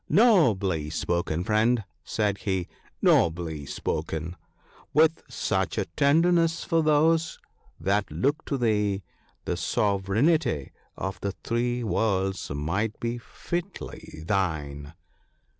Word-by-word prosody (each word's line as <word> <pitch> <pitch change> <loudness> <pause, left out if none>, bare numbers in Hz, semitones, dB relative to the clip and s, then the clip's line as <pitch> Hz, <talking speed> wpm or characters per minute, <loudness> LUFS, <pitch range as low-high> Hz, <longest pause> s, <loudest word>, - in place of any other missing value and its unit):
* - - -40
Nobly 105 - +4
spoken, 85 0 -1
friend/ 110 +3 +2 0.2
said 105 -2 -1
he, 95 -3 -1 0.4
'nobly 80 -4 +2
spoken! 80 +2 -3 0.6
with 160 +1 +4
such - - -1
a - - +1
tenderness 165 +3 +3
for 165 0 +2
those 160 +2 +3 0.4
that 100 +5 +1
look 145 +4 0
to 140 - -1
thee, 105 -5 +1 0.4
the - - -1
Sove 100 -2 0
reignty 110 - +1 0.3
of 95 0 -4
the 100 -1 -2
Three 120 +1 0
Worlds 95 -2 0
might 90 +10 -2
be 120 +1 -2
fitly 170 - -6
thine.' 80 -6 -2
105 Hz, 110 wpm, -26 LUFS, 90-145 Hz, 0.6 s, Nobly